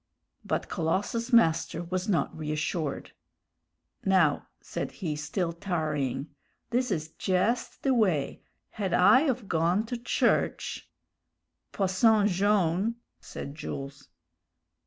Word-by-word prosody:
But - - -2
Colossus's 205 +9 -1
master 165 -6 +3
was 185 +3 -3
not 180 - +1
reassured. 155 0 -3 0.9
"Now," 185 -7 +3
said - - -5
he, 160 -5 -3
still 170 +3 -2
tarrying, 155 -6 -2 0.4
"this 250 +1 +1
is 155 -5 -2
jest 195 +8 -1
the 270 - +3
way; 185 - +1 0.3
had 195 -4 -3
I 260 +11 +6
of 245 -5 -2
gone 175 +6 +1
to 245 +2 -4
church 240 - 0 0.4
" - - -55
"Posson 200 +2 +3
Jone' 200 +1 +2
" - - -53
said 140 - -8
Jules. 140 -2 -7
180 Hz, 115 wpm, -28 LUFS, 160-210 Hz, 0.9 s, I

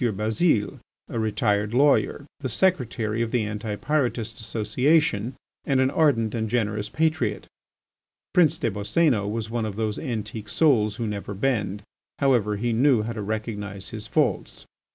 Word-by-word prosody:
Bazile, 110 - +1 0.3
a 115 - -3
retired 105 0 0
lawyer, 140 +1 +3
the 135 -3 -3
secretary 115 - +1
of 115 - 0
the 120 -1 +1
Anti 105 0 -4
pyrotist 120 -5 -1
Association, 115 +2 +1 0.3
and 135 -1 +1
an 130 0 +3
ardent 130 -9 +2
and 110 -2 -2
generous 105 -3 -1
patriot. 155 -4 0 0.9
Prince 170 -4 +4
des 115 - -1
Boscénos 105 - +1
was 110 0 -3
one 120 -1 -1
of 105 -2 -3
those 110 -1 -2
antique 110 -5 -5
souls 110 -10 +3
who 115 - -3
never 100 -1 -4
bend. 105 -3 -1 0.3
However, 120 -7 +2
he 115 +3 -1
knew 125 -1 +3
how 115 +2 -4
to 110 - -5
recognise 105 -2 -4
his 110 -2 -7
faults. - - -1
110 Hz, 150 wpm, -25 LUFS, 105-130 Hz, 0.9 s, Prince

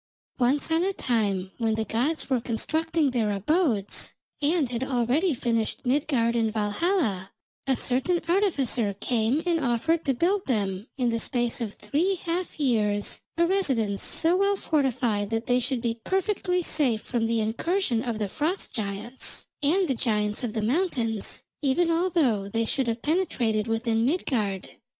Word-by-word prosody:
Once 270 +6 +2
on 325 +2 +3
a 390 +1 0
time 200 - -1
when 225 -2 +1
the 220 0 -1
gods 255 +10 -1
were 260 -3 +1
constructing 315 +6 0
their 230 -4 +1
abodes, 210 - 0 0.3
and 295 -2 +2
had 240 +1 -2
already 265 +6 +1
finished 230 +1 -1
Midgard 250 -3 +1
and 225 -2 +1
Valhalla, 210 - 0 0.4
a 265 - +3
certain 265 +9 +2
artificer 275 - +2
came 240 +7 0
and 335 -3 +1
offered 290 +7 +1
to 270 -3 +1
build 370 +8 +1
them, 200 -4 -1
in 250 -3 +1
the 230 - -1
space 240 0 0
of 215 -3 -4
three 360 +7 0
half 345 -1 -4
years, 210 -7 +1 0.2
a 340 - +4
residence 260 - +1
so 330 +2 +4
well 400 +1 +2
fortified 250 - 0
that 225 +1 -2
they 245 0 +2
should 250 0 -1
be 230 -1 -2
perfectly 375 -1 0
safe 260 -10 +2
from 235 -3 -1
the 230 0 +1
incursion 235 - 0
of 235 -2 -3
the 210 -2 -1
Frost 315 - -2
giants, 210 +4 -4 0.2
and 350 +6 +2
the 270 - +1
giants 210 -1 -1
of 230 -3 -2
the 220 - -2
mountains, 240 - -1 0.2
even 320 +5 +2
although 325 - +1
they 225 +2 0
should 260 +3 0
have 230 0 -2
penetrated 245 - 0
within 225 0 0
Midgard. 230 - -1
245 Hz, 160 wpm, -26 LUFS, 225-325 Hz, 0.4 s, a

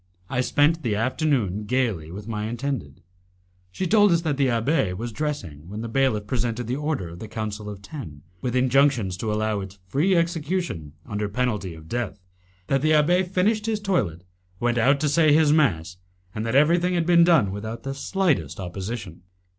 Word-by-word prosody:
I 125 -1 +1
spent 150 +5 +2
the 115 -6 0
afternoon 115 - 0
gaily 110 -10 0
with 100 +5 -8
my 105 -2 -3
intended. 120 - -4 0.7
She 185 - -3
told 205 +1 +5
us 170 -1 +3
that 155 -4 -1
the 135 -1 +2
abbé 115 - +1
was 115 +3 -4
dressing 100 - -4
when 105 +2 -5
the 115 - -4
bailiff 115 -4 +1
presented 120 0 -2
the 120 +3 -2
order 150 - -2
of 85 +1 -10
the 110 - -7
Council 105 -1 -5
of 100 -1 -9
Ten, 90 - -9 0.2
with 125 -1 -2
injunctions 130 -6 +3
to 110 +2 -2
allow 110 0 0
its 95 0 -8
free 150 - +2
execution 165 - -1
under 105 -3 -3
penalty 105 -6 -2
of 80 0 -13
death; 105 -2 -3 0.5
that 135 +5 +1
the 155 +1 +3
abbé 170 +5 +4
finished 210 +4 +1
his 220 -2 0
toilet, 115 - -1 0.4
went 120 0 +1
out 135 +5 +4
to 155 - +2
say 155 0 +4
his 150 -1 +5
mass, 90 - +1 0.4
and 110 +1 -3
that 115 - -1
everything 170 +5 +4
had 170 -1 +1
been 170 0 +6
done 160 - +4
without 110 +3 -6
the 135 - -3
slightest 160 - 0
opposition. 95 0 -6
120 Hz, 185 wpm, -24 LUFS, 105-150 Hz, 0.7 s, been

